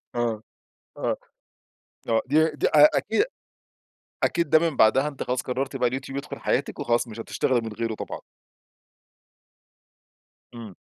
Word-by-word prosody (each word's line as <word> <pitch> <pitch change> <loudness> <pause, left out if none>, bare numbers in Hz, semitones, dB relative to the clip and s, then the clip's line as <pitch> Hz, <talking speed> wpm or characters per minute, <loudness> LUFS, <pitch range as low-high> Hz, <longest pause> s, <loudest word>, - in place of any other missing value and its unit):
آه، 115 -2 -1 0.5
آه، - - -1 0.9
آه، 115 -1 +2
دي 155 +4 +3
دي 150 - -1
أ 150 0 +7
أكيد 225 - +1 1.0
أكيد 170 -4 +1
ده 155 - +7
من 160 -3 -1
بعدها 135 +6 +4
أنتِ 140 -3 -7
خلاص 125 0 -1
قررتِ 135 +2 -3
بقى 125 -2 +2
اليوتيوب 135 +2 -5
يدخل 140 - -7
حياتِك - - -1
وخلاص 120 +1 0
مش 115 0 -8
هتشتغلي 125 +2 0
من 115 -1 -6
غيره 115 +1 -3
طبعًا. - - -6 2.3
إمم. 115 -5 -9
130 Hz, 140 wpm, -25 LUFS, 115-145 Hz, 2.3 s, أ